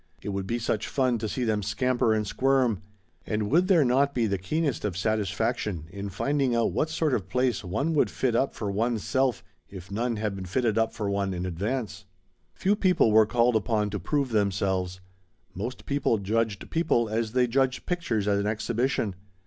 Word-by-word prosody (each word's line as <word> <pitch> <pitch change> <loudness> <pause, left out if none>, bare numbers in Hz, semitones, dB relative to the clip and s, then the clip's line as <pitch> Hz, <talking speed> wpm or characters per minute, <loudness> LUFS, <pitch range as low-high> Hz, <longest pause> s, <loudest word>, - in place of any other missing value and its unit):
It - - -4
would 100 -1 -3
be 115 - 0
such 110 -2 -1
fun 130 -4 +1
to 110 0 -3
see 125 - -2
them 110 -3 +1
scamper 120 +3 +1
and 110 -1 +1
squirm. 125 -1 +1 0.5
And 105 0 -1
would 175 +5 +4
there 170 -7 +5
not 140 +3 +2
be 120 -2 +2
the 100 -3 -1
keenest 145 - -1
of 100 -5 -2
satisfaction 105 -3 -1
in 100 +1 -5
finding 135 +6 0
out 115 - +2
what 155 - 0
sort 160 -2 0
of 95 -6 -1
place 125 0 0
one 140 - -1
would 150 - +3
fit 125 -3 0
up 135 +3 +1
for 105 -3 -3
one's 115 +1 0
self 130 -3 0 0.3
if 95 0 -10
none 115 +3 -1
had 105 -2 -2
been 95 -1 -6
fitted 115 +3 0
up 115 0 +2
for 110 -3 -4
one 100 -1 -1
in 90 +1 -3
advance? 105 +3 -3 0.5
Few 200 +2 +2
people 180 - +3
were 110 0 +6
called 120 0 +2
upon 105 -1 +1
to 105 - -3
prove 140 - 0
themselves. 95 -3 0 0.5
Most 115 +7 -5
people 140 -5 +1
judged 105 0 -1
people 160 -8 +2
as 110 +1 -2
they 125 -1 +4
judged 130 +1 0
pictures 125 - -1
at 100 -1 +2
an 100 - -1
exhibition. 115 0 -1
115 Hz, 195 wpm, -27 LUFS, 100-130 Hz, 0.5 s, were